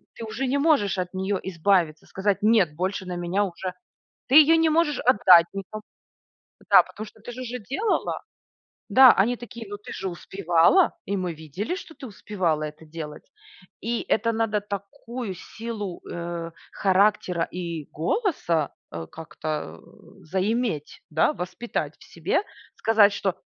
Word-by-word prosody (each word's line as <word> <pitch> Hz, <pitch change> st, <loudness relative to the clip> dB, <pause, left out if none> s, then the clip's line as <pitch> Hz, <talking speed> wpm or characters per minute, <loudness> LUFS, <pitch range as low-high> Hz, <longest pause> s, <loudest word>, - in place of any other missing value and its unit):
ты 230 Hz, -, -7 dB
уже 225 Hz, +5 st, -3 dB
не 275 Hz, +2 st, +1 dB
можешь 280 Hz, -11 st, +2 dB
от 180 Hz, 0 st, -3 dB
нее 190 Hz, +1 st, -1 dB
избавиться, 170 Hz, -3 st, +1 dB
сказать: 195 Hz, 0 st, -1 dB
"Нет, 205 Hz, -8 st, +3 dB
больше 185 Hz, +3 st, -2 dB
на 180 Hz, -1 st, -4 dB
меня 175 Hz, +4 st, 0 dB
уже". 185 Hz, -1 st, -4 dB, 0.6 s
Ты 270 Hz, -, +4 dB
ее 315 Hz, +1 st, +8 dB
не 325 Hz, -1 st, +3 dB
можешь 310 Hz, -3 st, +2 dB
отдать 185 Hz, -8 st, +6 dB
никому. 200 Hz, +2 st, -7 dB, 0.9 s
Да. -, -, +9 dB
Потому 215 Hz, -, -9 dB
что 210 Hz, -, -16 dB
ты 240 Hz, -, -8 dB
же 255 Hz, +2 st, -7 dB
уже 250 Hz, 0 st, -5 dB
делала. 275 Hz, -, -1 dB, 0.7 s
Да, 260 Hz, -1 st, +9 dB
они 230 Hz, +6 st, +2 dB
такие: 235 Hz, -2 st, -9 dB
"Ну, 205 Hz, -, -5 dB
ты 205 Hz, -, -11 dB
же 190 Hz, -1 st, -4 dB
успевала". 175 Hz, -, +3 dB
И 200 Hz, -, -2 dB
мы 180 Hz, -3 st, -2 dB
видели, 160 Hz, -, -5 dB
что 345 Hz, -4 st, -9 dB
ты 270 Hz, -, -10 dB
успевала 185 Hz, -7 st, -2 dB
это 150 Hz, +1 st, -7 dB
делать. 155 Hz, -1 st, -8 dB, 0.6 s
И 235 Hz, +2 st, -1 dB
это 230 Hz, +1 st, +2 dB
надо 220 Hz, -2 st, 0 dB
такую 205 Hz, +2 st, -6 dB
силу, 215 Hz, -2 st, -6 dB
э, 170 Hz, -1 st, -5 dB, 0.2 s
характера 190 Hz, -3 st, +2 dB
и 170 Hz, -4 st, -5 dB
голоса, 170 Hz, -, 0 dB, 0.2 s
э, 80 Hz, -1 st, -5 dB
как-то, 155 Hz, -, -5 dB
э, -, -, -19 dB
заиметь, 190 Hz, -, -1 dB
да, 155 Hz, -, +3 dB
воспитать 180 Hz, +7 st, -4 dB
в -, -, -15 dB
себе. -, -, -1 dB, 0.3 s
Сказать, 215 Hz, -2 st, +4 dB
что: 190 Hz, -2 st, -1 dB
195 Hz, 155 wpm, -25 LUFS, 170-230 Hz, 0.9 s, Да